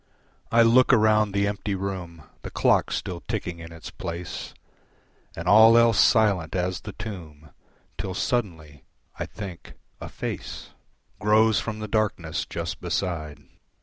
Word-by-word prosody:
I 115 0 +6
look 120 +4 +5
around 110 -3 +4
the 100 +1 +1
empty 100 0 -2
room, 90 -4 -5 0.2
The - - -7
clock - - +2
still 85 -2 -4
ticking 95 -6 -4
in 80 0 -10
its 80 -1 -10
place, 85 +1 -6 0.8
And 85 +2 -6
all 110 +3 +8
else 115 -3 +4
silent 100 -8 +3
as 90 0 -1
the 105 - -8
tomb, 80 -9 -9 0.5
Till 95 -1 -4
suddenly, 80 - -3 0.4
I - - -3
think, 95 -5 -9 0.3
a - - -7
face - - -6 0.5
Grows 110 +1 +4
from 110 -2 -4
the 110 - -4
darkness 100 -7 -1
just - - -5
beside. 75 -6 -3
100 Hz, 140 wpm, -25 LUFS, 85-110 Hz, 0.8 s, all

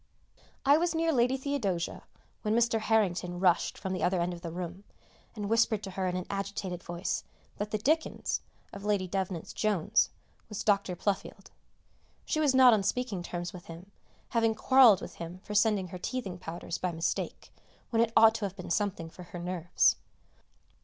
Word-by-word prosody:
I 285 +2 +7
was 335 0 0
near 325 0 +2
Lady 250 +1 +3
Theodosia 245 -11 -2 0.4
when 215 0 0
Mr. 235 -1 +3
Harrington 185 -5 +1
rushed 180 -2 +2
from 190 -1 -4
the 185 - -3
other 180 0 +2
end 175 +1 0
of 170 - -9
the 170 - -5
room, 175 +2 -6 0.5
and 205 -2 -4
whispered 225 -1 +2
to 195 - -6
her 185 0 -2
in 180 - -1
an 180 0 -3
agitated 195 -2 -4
voice 175 +2 -3 0.3
that 205 +1 -3
the 215 - -1
"Dickens" 310 +9 0 0.3
of 200 - -8
Lady 205 -3 +1
Devnant's 185 -2 -3
"Jones" 205 -7 +2 0.4
was 210 - -4
Dr. 200 -3 +2
Pluffield. 195 +2 -3 0.7
She 310 - 0
was 290 -4 +3
not 255 -2 +8
on 215 - +3
speaking 205 -1 -1
terms 175 0 -5
with 180 -2 -10
him, 170 +4 -10 0.4
having 225 -1 +2
quarrelled 245 -8 +6
with - - -8
him 170 +2 -7
for 210 - -6
sending 205 -3 +2
her 180 - -7
teething 195 -4 -4
powders 170 0 -5
by 180 - -1
mistake, 165 0 -3 0.4
when 225 -1 +3
it 230 -1 +2
ought 220 0 +8
to 225 -2 -2
have 195 -1 -5
been 180 -3 -7
something 195 -4 -1
for 165 - -12
her 175 - -9
nerves. 175 -1 +2
200 Hz, 180 wpm, -30 LUFS, 180-225 Hz, 0.7 s, not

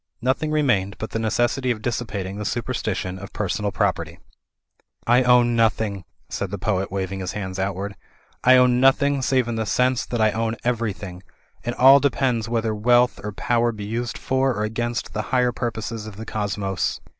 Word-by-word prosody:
Nothing 130 +5 0
remained 120 -11 +1
but 110 - -6
the 110 - -2
necessity 120 +3 0
of 110 -3 -2
dissipating 105 -5 -3
the - - -3
superstition 105 -5 -3
of 100 +1 -9
per 105 - -2
sonal 105 +2 -1
property. - - -1 0.9
"I 120 +2 +5
own 125 -1 +4
nothing," 110 -4 +1 0.2
said 100 - -4
the 100 - -4
poet, 95 -1 -1
waving 95 0 -3
his 95 - -4
hands 95 -2 -5
outward, 100 +1 -3 0.5
"I 130 +1 +7
own 125 -1 +4
nothing 140 +1 +3
save 130 -2 +1
in 115 -1 -2
the 110 - -1
sense 125 +1 +2
that 120 - -3
I 110 -1 +4
own 115 +1 -1
everjrthing. 105 -6 -2 0.6
All 135 +2 +8
depends 125 -5 0
whether 115 -2 0
wealth 120 +3 +3
or 105 - -4
power 120 +3 +1
be 105 -2 -7
used 115 +3 -3
for 130 -1 0
or 105 - -1
against 120 +2 -3
the 110 - -1
higher 125 -1 +2
purposes 115 -2 -4
of 105 - -9
the 110 +2 -8
cosmos." 100 -3 -2
115 Hz, 180 wpm, -23 LUFS, 100-125 Hz, 0.9 s, All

